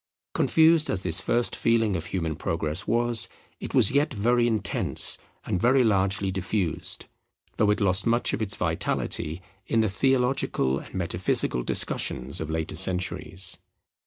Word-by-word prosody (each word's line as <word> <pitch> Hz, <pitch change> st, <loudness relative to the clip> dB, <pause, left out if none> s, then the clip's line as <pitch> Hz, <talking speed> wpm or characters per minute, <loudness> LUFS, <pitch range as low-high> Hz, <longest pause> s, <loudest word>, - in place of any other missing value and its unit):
Confused 160 Hz, -1 st, +4 dB
as 95 Hz, -, -1 dB
this 80 Hz, +3 st, +2 dB
first 120 Hz, +3 st, 0 dB
feeling 115 Hz, -3 st, +1 dB
of 85 Hz, 0 st, -4 dB
human 80 Hz, -4 st, -3 dB
Progress 80 Hz, +3 st, -2 dB
was, 120 Hz, -1 st, +2 dB, 0.3 s
it -, -, -6 dB
was 95 Hz, -, +6 dB
yet 145 Hz, +3 st, +1 dB
very 120 Hz, +1 st, +1 dB
intense 110 Hz, -4 st, +1 dB, 0.3 s
and 90 Hz, -, -2 dB
very 130 Hz, +2 st, +4 dB
largely 95 Hz, -2 st, +1 dB
diffused; 95 Hz, -2 st, -2 dB, 0.5 s
though 105 Hz, -, +2 dB
it 105 Hz, -, +2 dB
lost 95 Hz, 0 st, +3 dB
much 120 Hz, +1 st, +2 dB
of -, -, -2 dB
its 100 Hz, -2 st, -1 dB
vitality 80 Hz, +4 st, -2 dB, 0.2 s
in 115 Hz, -, +2 dB
the 110 Hz, -, +1 dB
theological 125 Hz, -, 0 dB
and -, -, -12 dB
metaphysical 85 Hz, -7 st, -1 dB
discussions 65 Hz, +3 st, -1 dB
of 80 Hz, -, -5 dB
later 80 Hz, 0 st, -3 dB
centuries. 95 Hz, -1 st, -2 dB
100 Hz, 145 wpm, -25 LUFS, 90-120 Hz, 0.5 s, was